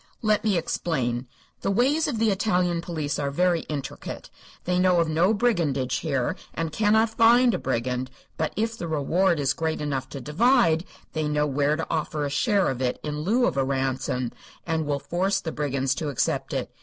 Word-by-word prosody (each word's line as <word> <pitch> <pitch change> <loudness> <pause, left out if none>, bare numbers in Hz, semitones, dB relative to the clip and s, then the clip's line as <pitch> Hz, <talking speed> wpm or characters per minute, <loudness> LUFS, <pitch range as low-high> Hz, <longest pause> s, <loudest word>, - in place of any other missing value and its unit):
"Let 215 -1 +2
me 210 -4 +2
explain. 130 -7 -1 0.3
The - - -1
ways 265 +10 +2
of 270 -6 -2
the 220 -1 +2
Italian 180 -4 +1
police 155 -4 -3
are 140 -1 -1
very 175 +4 +2
intricate. 145 -3 -6 0.3
They 180 0 +1
know 180 -1 +4
of 165 - +2
no 165 +5 +3
brigandage 165 - +1
here, 135 -6 -1 0.2
and 165 -1 -2
cannot 220 +5 +3
find 235 +2 +5
a - - -1
brigand. 125 +2 -2 0.3
But 160 - -1
if 225 +1 -1
the 175 - -5
reward 165 +3 +1
is 135 -1 +2
great 160 0 -2
enough 135 -3 -3
to 140 - -6
divide, 165 - +3 0.3
they 155 -1 -1
know 150 0 +1
where 145 +1 +1
to 165 - -3
offer 155 -2 -1
a 140 - -3
share 200 - +2
of 130 -1 -5
it, 125 -1 0
in 150 -1 -3
lieu 225 +11 +2
of - - -1
a 135 - +3
ransom, 130 -2 -1 0.3
and 160 -2 -1
will 145 -1 0
force 185 +7 0
the 160 - -4
brigands 135 -3 -1
to 155 0 -3
accept 140 - -1
it. - - -3
160 Hz, 195 wpm, -25 LUFS, 140-195 Hz, 0.3 s, find